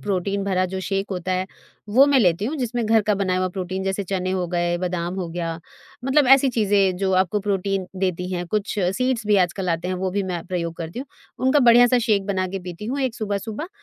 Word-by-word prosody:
Protein 200 0 -1
भरा 185 -2 +1
जो 190 - -3
shake 195 +2 -2
होता 185 0 -2
है, 185 +1 -1 0.4
वो 255 +7 +6
मैं 280 -2 +4
लेती 180 -2 +2
हूँ 290 +8 -2
जिसमें 245 -3 -2
घर 225 0 +4
का 210 0 +1
बना 190 -2 0
हुआ 185 0 0
प्रोटीन, 185 0 -4
जैसे 195 +1 -2
चने 185 0 -2
हो 185 -2 -1
गए, 175 0 0
बादाम 180 -1 -2
हो 185 -3 -4
गया, 165 -1 -4 0.5
मतलब 270 +1 +3
ऐसी 270 0 +6
चीज़ें 200 -5 +2
जो 190 0 0
आपको 190 +2 +1
प्रोटीन 195 -1 -1
देती 180 -1 -1
हैं। 175 -1 -3
कुछ 210 +1 -2
सीड्स 230 +5 0
भी 210 -1 +4
आजकल 185 0 0
आते 165 +2 -2
हैं, 185 - -1
वो 185 0 -2
भी 200 +1 -1
मैं 180 -3 -4
प्रयोग 170 -2 -3
करती 165 +7 -6
हूँ। 275 - -5 0.4
उनका 290 +3 +4
बढ़िया-सा 245 +1 +6
शेक 215 -4 +1
बनाके 190 -1 -2
पीती 180 +3 -8
हूँ, 275 +4 -2
एक 260 -3 -1
सुबह-सुबह 215 - -4
195 Hz, 220 wpm, -22 LUFS, 180-215 Hz, 0.5 s, वो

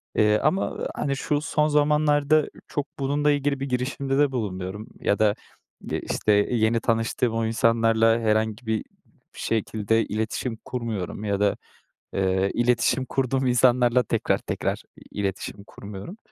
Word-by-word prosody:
eee, 105 -1 +4
ama, 155 +7 0
hani, 140 -1 -1
şu 145 +1 -1
son 150 -1 +1
zamanlarda 150 0 +3 0.2
çok 145 -1 -3
bununla 145 +2 +1
ilgili 145 -1 0
bir 135 +1 -3
girişimde 135 +2 -1
de 145 -1 +3
bulunmuyorum 105 -3 -4
ya 100 - +1
da, 105 -1 +3 0.6
eee, - - -1
işte, 110 - +1
yeni 110 +2 +2
tanıştığım 115 +1 0
o 115 0 0
insanlarla 115 0 +3
herhangi 110 +1 0
bir 110 -1 0 0.5
şekilde 110 0 0
iletişim 110 +2 -3
kurmuyorum 110 -6 -4
ya 100 -2 -1
da, 100 -1 +2 0.6
eee, 95 0 +1
iletişim 120 +1 +2
kurduğum 130 0 0
insanlarla 125 0 +4
tekrar 115 - 0
tekrar - - -3 0.3
iletişim 100 0 -4
kurmuyorum. 100 - -9
115 Hz, 130 wpm, -25 LUFS, 110-135 Hz, 0.6 s, eee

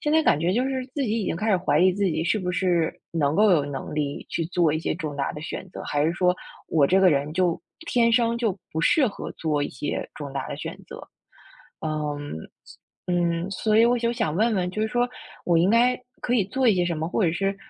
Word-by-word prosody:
现 300 - 0
在 320 0 +4
感 150 - +3
觉 170 +3 +1
就 240 +5 +1
是 265 -1 -2
自 285 - -1
己 225 -2 0
已 - - -3
经 - - -1
开 215 +6 -2
始 190 - +5
怀 155 -4 +1
疑 185 +1 +6
自 200 +2 -1
己 170 -4 0
是 215 - +1
不 180 -2 -2
是 175 -3 +1 0.2
能 150 -3 +1
够 210 +3 +5
有 155 -6 +4
能 145 0 -6
力 145 -2 -2
去 165 - -2
做 170 -2 +2
一 155 - 0
些 - - -2
重 150 -3 -5
大 140 - -1
的 150 - -7
选 160 +4 -6
择， - - -8
还 145 0 0
是 160 - +2
说 180 +1 +2 0.3
我 155 -3 +3
这 190 +6 +3
个 190 - +6
人 145 +1 0
就 175 0 +1 0.3
天 235 -6 +3
生 235 0 +3
就 225 -5 -1
不 160 - -4
适 270 - +4
合 200 - -7
做 150 -3 -1
一 - - -3
些 145 +3 -4
重 145 -2 -7
大 135 - -3
的 - - -5
选 - - -6
择。 - - -9 0.8
嗯， 150 - -3 0.7
嗯， 175 0 0
所 215 +2 +1
以 225 - +7
我 245 +1 +2
就 235 0 0
想 155 -10 -1
问 220 +5 +2
问， 180 -2 0
就 215 +4 -2
是 220 - 0
说 245 +1 +1 0.4
我 170 -2 +3
应 175 +4 +3
该 245 +3 +3 0.2
可 245 - 0
以 220 -6 +3
做 260 +4 +1
一 215 - +5
些 180 -1 +1
什 175 -2 -1
么， 160 +1 -2
或 200 +3 +1
者 165 - +2
是 195 +3 -1
180 Hz, 270 characters per minute, -25 LUFS, 155-220 Hz, 0.8 s, 以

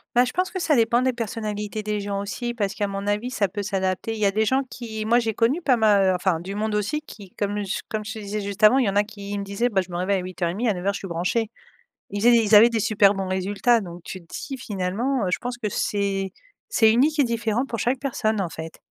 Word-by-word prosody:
Bah, 245 +1 +6
je 250 - -4
pense 365 0 0
que 375 - -4
ça 320 -3 +2
dépend 235 +1 +3
des 260 0 +2
personnalités 215 -2 -4
des 210 0 -2
gens 200 0 -3
aussi 240 +4 -4
parce 200 -3 -1
qu'à 205 -2 -1
mon 195 0 -4
avis, 210 +4 -1
ça 215 -6 0
peut 205 +3 -5
s'adapter. 190 +1 -1
Il 220 - -6
y 210 - +2
a 195 - +4
des 215 +2 +1
gens 265 +5 +2
qui 220 -3 -6
moi 235 +2 +4
j'ai 225 -2 -2
connu 260 +10 +2
pas 260 -6 +3
ma 210 -3 +4
heu, 190 -1 +3
enfin 180 -2 0
du 190 +4 -6
monde 215 0 -1
aussi 210 +9 -1
qui 205 -9 -12
comme 205 0 -1
ch 195 +1 -3
comme 215 -1 -3
je 220 +1 -6
te 220 - -7
disais 210 +1 -4
juste 200 +1 -5
avant, 245 +5 +7
il 255 - +2
y - - +2
en 195 - -3
a 205 - +4
qui 205 -1 -7
me 200 - -3
disaient: 200 +5 -1
«Bah, 195 -4 +2
je - - -14
me 175 - -3
réveille 190 +2 +1
à - - -8
8:30, 185 +5 -2
à 210 - +3
9:00 190 +3 -1
je - - -4
suis 195 - -7
branché». 180 +7 -1 0.6
Ils 205 0 -3
faisaient 240 +2 +6
des 230 -1 +5
ils 215 0 +3
avaient 220 +3 +9
des 230 -2 -1
super 205 -1 +4
bons 195 -1 -3
résultats 200 +5 +2
donc 175 -2 -9
tu 185 - -7
te 170 - -20
dis: 270 0 -6
«Finalement, 210 +5 -1
heu, 180 - 0
je - - +1
pense 245 0 -4
que 215 -4 -3
c'est 195 -2 -1 0.4
c'est 220 - +4
unique 295 +6 +2
et 285 - +5
différent 230 +1 0
pour 235 -4 -5
chaque 245 +5 0
personne 220 -6 -1
en 175 - -3
fait». 160 +1 -8
210 Hz, 280 wpm, -24 LUFS, 195-235 Hz, 0.6 s, avaient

